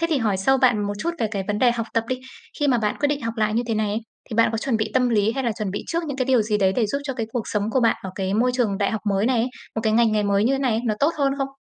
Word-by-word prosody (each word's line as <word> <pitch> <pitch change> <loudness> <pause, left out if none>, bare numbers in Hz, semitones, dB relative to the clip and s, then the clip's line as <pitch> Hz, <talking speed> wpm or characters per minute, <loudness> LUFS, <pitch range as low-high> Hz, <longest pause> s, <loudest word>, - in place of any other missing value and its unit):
Thế 335 - +2
thì 295 - +2
hỏi 210 -5 +1
sâu 265 +8 +3
bạn 225 -6 +3
một 205 - -2
chút 340 - -1
về 225 - +1
cái 200 -3 -2
vấn 210 0 -1
đề 250 -2 +4
học 230 -1 -2
tập 230 - +1
đi. 255 0 -2 0.4
Khi 290 - +2
mà 245 - +3
bạn 210 -2 -1
quyết 290 - +1
định 290 -3 -2
học 230 0 -3
lại 215 -1 +1
như 235 - +2
thế 225 - -1
này 215 -1 0
ấy, 215 +2 -1 0.3
thì - - -4
bạn 230 - +5
có 225 - -1
chuẩn 250 -1 0
bị 215 0 -2
tâm 250 -1 +3
lý 220 -1 +2
hay 270 0 -3
là 235 - +1
chuẩn 210 -3 -2
bị 205 - -4
trước 335 0 -2
những 280 - -4
cái 255 - 0
điều 255 -4 +3
gì 210 -1 0
đấy 190 -1 +3
để 230 -4 +2
giúp 280 +7 -1
cho 270 -2 -3
cái 230 -3 -3
cuộc 235 -3 -3
sống 210 +1 -1
của 260 - +2
bạn 230 -1 +3
ở 190 - -5
cái 190 0 -2
môi 245 +3 +3
trường 220 -6 0
đại 200 - +1
học 220 - -2
mới 195 +2 +1
này 255 -1 +2
ấy, 235 +3 +1 0.3
một 220 - -1
cái 215 - +2
ngành 230 -1 +4
nghề 210 -1 +2
mới 200 +1 +2
như 255 - +3
thế 270 - +1
này, 240 -5 +1
nó 215 -2 +1
tốt 300 +4 +3
hơn 275 -2 +2
không? 275 0 -1
225 Hz, 365 wpm, -23 LUFS, 210-255 Hz, 0.4 s, bạn